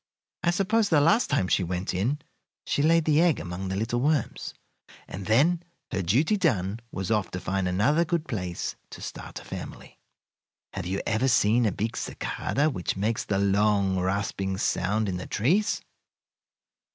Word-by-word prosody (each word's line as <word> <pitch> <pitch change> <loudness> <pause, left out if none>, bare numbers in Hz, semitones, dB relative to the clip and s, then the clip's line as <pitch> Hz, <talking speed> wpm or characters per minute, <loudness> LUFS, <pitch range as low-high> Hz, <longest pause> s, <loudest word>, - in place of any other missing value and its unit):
I 175 - +2
suppose 200 +4 +2
the 155 - +5
last 165 +11 +4
time 130 -10 +1
she 95 - +2
went 90 +2 -2
in 110 +11 0 0.5
she - - 0
laid 165 +1 +4
the 155 0 +4
egg 170 -4 +3
among 90 +2 -5
the 95 - -2
little 115 +4 -1
worms, 145 -3 -1 0.5
and 95 +1 -7
then, 155 +10 +4 0.3
her 100 - -1
duty 130 - +2
done, 110 - 0
was 95 +2 -3
off 105 -5 +1
to 90 - -5
find 95 0 -1
another 110 - +3
good 170 -1 -1
place 90 -8 -3
to - - -10
start - - -7
a - - -14
family. - - -8 0.7
"Have - - -4
you 95 +2 -1
ever 110 +5 +1
seen 115 -1 +4
a - - +1
big 110 +4 -3
cicada 145 +2 -1
which 90 -4 -3
makes 110 +3 0
the 100 - 0
long, 100 -1 +2
rasping 95 0 -1
sound 105 +3 0
in 90 -2 -2
the 90 - -6
trees? 190 - +1
110 Hz, 170 wpm, -27 LUFS, 95-150 Hz, 0.7 s, the